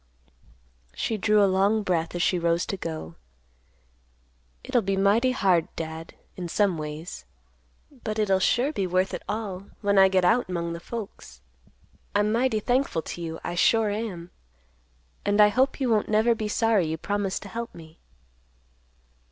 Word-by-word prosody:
She 225 Hz, -, -1 dB
drew 210 Hz, 0 st, +3 dB
a -, -, +6 dB
long 200 Hz, +3 st, +2 dB
breath 170 Hz, -3 st, -1 dB
as 175 Hz, -, 0 dB
she 180 Hz, -, +2 dB
rose 170 Hz, 0 st, +1 dB
to -, -, -3 dB
go. 160 Hz, -, -6 dB, 1.5 s
"It'll 245 Hz, -, +1 dB
be 195 Hz, -1 st, -1 dB
mighty 205 Hz, +6 st, +3 dB
hard, 190 Hz, -9 st, +2 dB
Dad, 160 Hz, 0 st, -6 dB, 0.2 s
in 180 Hz, -2 st, -5 dB
some 200 Hz, +1 st, +2 dB
ways; 155 Hz, +3 st, -6 dB, 0.8 s
but 215 Hz, -1 st, -3 dB
it'll 195 Hz, -3 st, +2 dB
sure 255 Hz, +9 st, +2 dB
be 195 Hz, -8 st, -1 dB
worth 185 Hz, +1 st, 0 dB
it -, -, -4 dB
all 200 Hz, -3 st, -4 dB
when 200 Hz, -1 st, +3 dB
I 190 Hz, -, +8 dB
get 190 Hz, -1 st, +2 dB
out 235 Hz, +6 st, +3 dB
'mong 170 Hz, -2 st, -2 dB
the 170 Hz, -, -6 dB
folks. 195 Hz, -, -8 dB, 0.8 s
I'm 205 Hz, +1 st, +2 dB
mighty 235 Hz, -1 st, +1 dB
thankful 245 Hz, -, 0 dB
to 175 Hz, -, -7 dB
you, 165 Hz, -1 st, -5 dB
I -, -, -3 dB
sure 215 Hz, +4 st, +3 dB
am. 200 Hz, -5 st, -5 dB, 0.9 s
And 205 Hz, +1 st, +1 dB
I 210 Hz, 0 st, +8 dB
hope 260 Hz, +7 st, +1 dB
you 265 Hz, -, 0 dB
won't 215 Hz, -2 st, +1 dB
never 220 Hz, +2 st, +3 dB
be 220 Hz, -2 st, -3 dB
sorry 215 Hz, -4 st, +2 dB
you 160 Hz, +1 st, -2 dB
promised 200 Hz, +2 st, -2 dB
to -, -, -9 dB
help 235 Hz, 0 st, -6 dB
me." 160 Hz, -1 st, -14 dB
195 Hz, 165 wpm, -26 LUFS, 175-220 Hz, 1.5 s, I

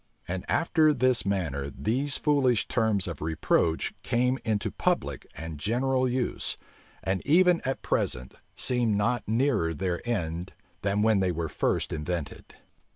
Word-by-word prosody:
And 90 Hz, +1 st, -4 dB
after 160 Hz, -3 st, +3 dB
this 130 Hz, -4 st, +2 dB
manner 75 Hz, -8 st, -1 dB
these 130 Hz, -, -1 dB
foolish 135 Hz, -7 st, +2 dB
terms 110 Hz, -5 st, +1 dB
of 85 Hz, -, -6 dB
reproach 80 Hz, +1 st, +1 dB
came 125 Hz, +2 st, +1 dB
into 110 Hz, -3 st, -1 dB
public 70 Hz, -1 st, -1 dB
and 80 Hz, -2 st, -7 dB
general 130 Hz, -, +1 dB
use; 125 Hz, 0 st, -2 dB, 0.5 s
and 95 Hz, -1 st, 0 dB
even 180 Hz, +2 st, +4 dB
at 135 Hz, +1 st, -2 dB
present 65 Hz, +1 st, -1 dB, 0.2 s
seem 120 Hz, -5 st, +1 dB
not 110 Hz, +4 st, +1 dB
nearer 110 Hz, -, +1 dB
their 90 Hz, 0 st, -2 dB
end 85 Hz, -5 st, -2 dB, 0.3 s
than 100 Hz, +1 st, +1 dB
when 110 Hz, -2 st, +4 dB
they 95 Hz, -1 st, +2 dB
were 80 Hz, -1 st, -3 dB
first -, -, -1 dB
invented. 80 Hz, 0 st, -5 dB
105 Hz, 140 wpm, -27 LUFS, 85-130 Hz, 0.5 s, even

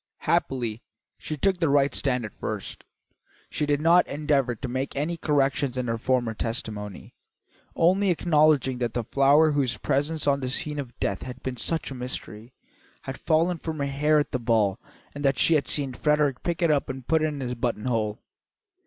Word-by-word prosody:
Happily, 120 Hz, -4 st, -1 dB, 0.4 s
she 155 Hz, -, -5 dB
took 190 Hz, +4 st, +1 dB
the 165 Hz, -3 st, +2 dB
right 140 Hz, 0 st, +3 dB
stand 125 Hz, -4 st, 0 dB
at 105 Hz, -, -11 dB
first. -, -, -5 dB, 0.7 s
She 150 Hz, -, -1 dB
did 145 Hz, -1 st, +2 dB
not 170 Hz, +3 st, +4 dB
endeavour 140 Hz, -4 st, 0 dB
to 130 Hz, -, -6 dB
make 130 Hz, +2 st, -3 dB
any 150 Hz, +5 st, -1 dB
corrections 140 Hz, -4 st, 0 dB
in 125 Hz, -, -1 dB
her 115 Hz, 0 st, -2 dB
former 120 Hz, -2 st, 0 dB
testimony, 105 Hz, -3 st, -5 dB, 0.6 s
only 190 Hz, +4 st, +3 dB
acknowledging 155 Hz, -6 st, +3 dB
that 120 Hz, -2 st, -2 dB
the 120 Hz, -, 0 dB
flower 140 Hz, +6 st, +4 dB
whose 135 Hz, -4 st, 0 dB
presence 150 Hz, +3 st, 0 dB
on 140 Hz, -1 st, +2 dB
the 130 Hz, -2 st, -3 dB
scene 150 Hz, +3 st, -1 dB
of 125 Hz, -4 st, -7 dB
death 100 Hz, -1 st, -1 dB
had 125 Hz, 0 st, -8 dB
been 130 Hz, -1 st, -4 dB
such 160 Hz, +5 st, -1 dB
a -, -, -4 dB
mystery, 125 Hz, -2 st, -5 dB, 0.5 s
had 135 Hz, -, -6 dB
fallen 165 Hz, +2 st, +1 dB
from 160 Hz, 0 st, -5 dB
her 140 Hz, -, -1 dB
hair 150 Hz, +2 st, +2 dB
at 145 Hz, -, 0 dB
the 130 Hz, -, -1 dB
ball 110 Hz, -5 st, +1 dB, 0.3 s
and 145 Hz, -, -7 dB
that 135 Hz, -2 st, +2 dB
she 165 Hz, -, +4 dB
had 150 Hz, -3 st, +2 dB
seen 140 Hz, -3 st, +1 dB
Frederick 150 Hz, -1 st, +1 dB
pick 175 Hz, 0 st, -2 dB
it 165 Hz, -, +4 dB
up 145 Hz, -1 st, 0 dB
and 130 Hz, -1 st, -6 dB
put 160 Hz, -1 st, +3 dB
it 155 Hz, -, +2 dB
in 150 Hz, -2 st, -4 dB
his 125 Hz, -2 st, -3 dB
buttonhole. 115 Hz, -2 st, -2 dB
135 Hz, 190 wpm, -26 LUFS, 125-150 Hz, 0.7 s, not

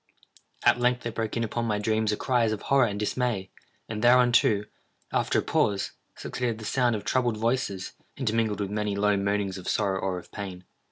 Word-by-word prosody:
At -, -, +5 dB
length 125 Hz, 0 st, +1 dB
there 120 Hz, -, -3 dB
broke 110 Hz, 0 st, -3 dB
in 115 Hz, -, 0 dB
upon 115 Hz, +1 st, -2 dB
my 105 Hz, -2 st, 0 dB
dreams 110 Hz, +1 st, +1 dB
a 105 Hz, -, -1 dB
cry 125 Hz, -3 st, +1 dB
as 110 Hz, -, +2 dB
of 110 Hz, -, -6 dB
horror 135 Hz, -3 st, +4 dB
and 100 Hz, -1 st, -4 dB
dismay; 105 Hz, -3 st, -1 dB, 0.4 s
and 110 Hz, 0 st, -4 dB
thereunto, 120 Hz, -4 st, +5 dB, 0.5 s
after -, -, +1 dB
a -, -, +3 dB
pause, 100 Hz, -2 st, +1 dB, 0.2 s
succeeded 120 Hz, -3 st, -3 dB
the 110 Hz, -, -8 dB
sound 120 Hz, 0 st, +2 dB
of 105 Hz, -, -5 dB
troubled 120 Hz, -4 st, +1 dB
voices, 105 Hz, -5 st, -1 dB, 0.3 s
intermingled 110 Hz, -4 st, 0 dB
with 100 Hz, -1 st, -3 dB
many 105 Hz, -1 st, -1 dB
low 105 Hz, 0 st, +2 dB
moanings 100 Hz, -1 st, -1 dB
of 90 Hz, -, -5 dB
sorrow 100 Hz, -3 st, +1 dB
or 95 Hz, -1 st, -2 dB
of 90 Hz, -, -11 dB
pain. 95 Hz, -3 st, -6 dB
110 Hz, 200 wpm, -27 LUFS, 100-120 Hz, 0.5 s, At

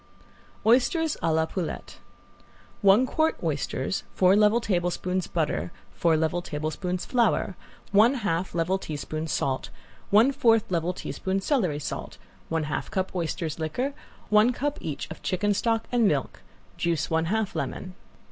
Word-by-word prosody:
~OYSTERS 280 Hz, +7 st, +3 dB
A 165 Hz, -, +1 dB
LA 160 Hz, 0 st, +2 dB
POULETTE~ 175 Hz, 0 st, -5 dB, 0.8 s
One 200 Hz, +5 st, +6 dB
quart 315 Hz, +4 st, +1 dB
oysters, -, -, -1 dB
four 185 Hz, +1 st, +5 dB
level 210 Hz, +2 st, +5 dB
tablespoons 180 Hz, -3 st, -1 dB
butter, 150 Hz, -, -1 dB, 0.2 s
four 165 Hz, -2 st, +2 dB
level 160 Hz, +2 st, 0 dB
tablespoons 160 Hz, +4 st, -3 dB
flour, 230 Hz, -5 st, +1 dB, 0.4 s
one 220 Hz, +6 st, +5 dB
half 185 Hz, -7 st, -2 dB
level 175 Hz, +3 st, +1 dB
teaspoon 155 Hz, 0 st, -4 dB
salt, 135 Hz, -3 st, -1 dB, 0.4 s
one 220 Hz, +7 st, +6 dB
fourth 230 Hz, -6 st, +4 dB
level 170 Hz, 0 st, +1 dB
teaspoon 190 Hz, +1 st, -3 dB
celery 195 Hz, -, +1 dB
salt, 145 Hz, -, -5 dB, 0.3 s
one 160 Hz, -1 st, 0 dB
half 150 Hz, -, -3 dB
cup 190 Hz, 0 st, -2 dB
oysters 165 Hz, -2 st, -2 dB
liquor, 245 Hz, -, -2 dB, 0.4 s
one 215 Hz, +3 st, +5 dB
cup 285 Hz, +4 st, -2 dB
each 150 Hz, -3 st, -4 dB
of 160 Hz, -, -8 dB
chicken 205 Hz, +3 st, +1 dB
stock 225 Hz, +2 st, 0 dB
and 240 Hz, -3 st, +4 dB
milk, 140 Hz, -7 st, -1 dB, 0.4 s
juice 170 Hz, -2 st, 0 dB
one 160 Hz, 0 st, +2 dB
half 215 Hz, +3 st, -1 dB
lemon. 185 Hz, -1 st, -4 dB
185 Hz, 140 wpm, -26 LUFS, 160-225 Hz, 0.8 s, One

